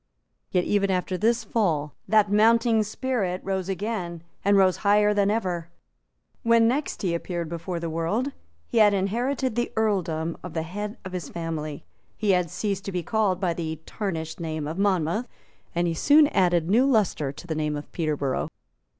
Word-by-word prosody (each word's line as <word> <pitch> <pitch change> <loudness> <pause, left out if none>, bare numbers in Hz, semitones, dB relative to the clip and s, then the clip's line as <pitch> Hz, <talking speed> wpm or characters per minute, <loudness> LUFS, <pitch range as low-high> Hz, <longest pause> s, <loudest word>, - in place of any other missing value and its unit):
Yet 180 - +2
even 200 0 +1
after 185 0 0
this 230 +5 +1
fall, 155 -10 0
that 210 -2 +4
mounting 225 +1 +4
spirit 210 -4 -1
rose 190 -1 -2
again, 185 -4 -3 0.2
and 200 0 +4
rose 185 -2 +4
higher 210 +1 +4
than 200 -1 +2
ever. 180 -6 -1 0.7
When 230 0 +4
he - - +5
next 275 -1 -2
appeared 170 -1 -2
before 170 +1 -4
the 170 - -3
world, 165 - -1 0.3
he 230 - 0
had 205 -2 +6
inherited 240 +6 0
the 240 +2 -1
earldom 175 -7 0
of 180 -2 -8
the 160 - 0
head 205 +5 -5
of 185 - -6
his 180 -5 -5
family; 160 -3 -5 0.3
he 210 -2 +2
had 180 -2 +2
ceased 200 +2 -2
to 195 - -3
be 180 -2 -2
called 205 -1 +1
by 180 -3 0
the 160 -2 -4
tarnished 160 -6 -4
name 155 -3 -3
of 160 +5 -4
Monmouth; 195 +3 +1 0.5
and 175 +1 +2
he 165 - 0
soon 295 - +6
added 175 -4 +2
new 235 +8 +4
lustre 205 - +1
to 140 - -11
the 165 - -2
name 150 -1 -1
of 145 - -7
Peterborough. 150 -5 -1
185 Hz, 175 wpm, -25 LUFS, 165-215 Hz, 0.7 s, had